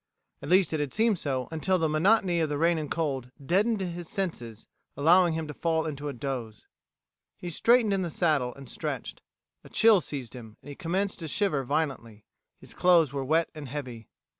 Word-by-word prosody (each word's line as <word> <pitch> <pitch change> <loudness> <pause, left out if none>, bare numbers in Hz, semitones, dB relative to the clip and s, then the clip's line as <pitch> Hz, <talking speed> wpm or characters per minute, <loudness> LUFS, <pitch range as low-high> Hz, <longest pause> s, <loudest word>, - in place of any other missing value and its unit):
At - - -7
least 185 -1 +4
it 155 - 0
had 145 -3 -2
seemed 220 -4 +2
so 130 -3 -2
until 180 +4 0
the 165 -2 +1
monotony 175 +3 +2
of 160 -2 0
the 145 - -2
rain 165 +1 +2
and 150 -2 -5
cold 135 -7 -2 0.2
deadened 205 - +2
his 175 -2 -5
senses, 120 - -4 0.3
allowing 170 +3 +4
him 160 -1 -3
to 150 - -6
fall 160 +1 0
into 150 -2 -5
a - - -5
doze. 125 -5 -5 0.7
He 175 - -6
straightened 230 +4 +3
in 195 - 0
the 175 - -2
saddle, 150 -7 +1
and 140 -1 -12
stretched. - - -5 0.4
A - - -14
chill 220 -4 +5
seized 130 -9 -7
him, 110 -3 -11
and - - -11
he 145 - -7
commenced 190 +5 -2
to 165 - -5
shiver 155 -4 0
violently. 125 -7 -3 0.3
His - - -12
clothes 170 -6 +4
were 140 -1 -2
wet 160 +5 +1
and 150 -3 -8
heavy. 125 -5 -7
160 Hz, 195 wpm, -27 LUFS, 135-180 Hz, 0.7 s, chill